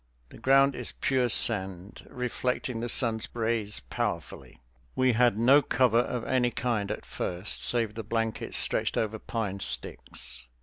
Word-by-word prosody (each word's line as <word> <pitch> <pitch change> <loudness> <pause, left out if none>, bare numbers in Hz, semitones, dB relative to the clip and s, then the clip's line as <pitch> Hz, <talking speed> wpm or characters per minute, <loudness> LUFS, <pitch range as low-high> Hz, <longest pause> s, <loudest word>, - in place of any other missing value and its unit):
The - - -14
ground 135 +1 +4
is 125 -1 -4
pure 130 -2 0
sand, 95 -3 +1
reflecting 125 -1 -3
the 120 +1 -3
sun's 115 -3 +1
rays 110 - -1
powerfully. - - -5 0.4
We 130 -1 +3
had 120 -2 +3
no 130 +6 +6
cover 125 -3 +3
of 120 -1 -2
any 125 -2 +2
kind 115 -4 -2
at - - -5
first, 90 +3 -3
save 115 -3 +1
the 115 - -5
blankets 115 +1 -1
stretched - - +1
over 110 0 -1
pine 105 -4 -4
sticks. 60 -3 -2
115 Hz, 145 wpm, -28 LUFS, 105-125 Hz, 0.4 s, no